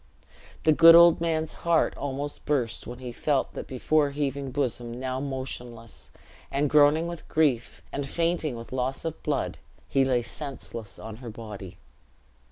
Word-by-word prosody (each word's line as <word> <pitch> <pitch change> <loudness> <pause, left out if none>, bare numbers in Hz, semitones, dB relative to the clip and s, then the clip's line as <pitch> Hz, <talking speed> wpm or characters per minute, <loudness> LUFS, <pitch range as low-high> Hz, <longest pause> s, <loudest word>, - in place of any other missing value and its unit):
The 155 - +5
good 165 +2 +9
old 170 -1 +7
man's 160 -2 0
heart 170 -2 +2
almost 140 +1 -4
burst 125 -6 -1
when 120 - -7
he 125 -1 -7
felt 140 +3 0
that - - -6
before 145 +3 +1
heaving 140 -1 -2
bosom 120 -3 -2
now 130 0 -2
motionless; 125 -4 -6 0.4
and 140 +1 0
groaning 150 +2 +5
with 170 -2 -7
grief, 140 -7 +1
and 140 -1 -4
fainting 165 -4 0
with 115 0 -9
loss 130 +3 -2
of 160 -1 -4
blood, 145 -3 -2 0.3
he 135 - +3
lay 125 -2 +1
senseless 120 -6 -6
on 110 0 -8
her 120 -1 -8
body. 105 -4 -9
135 Hz, 155 wpm, -27 LUFS, 120-155 Hz, 0.4 s, good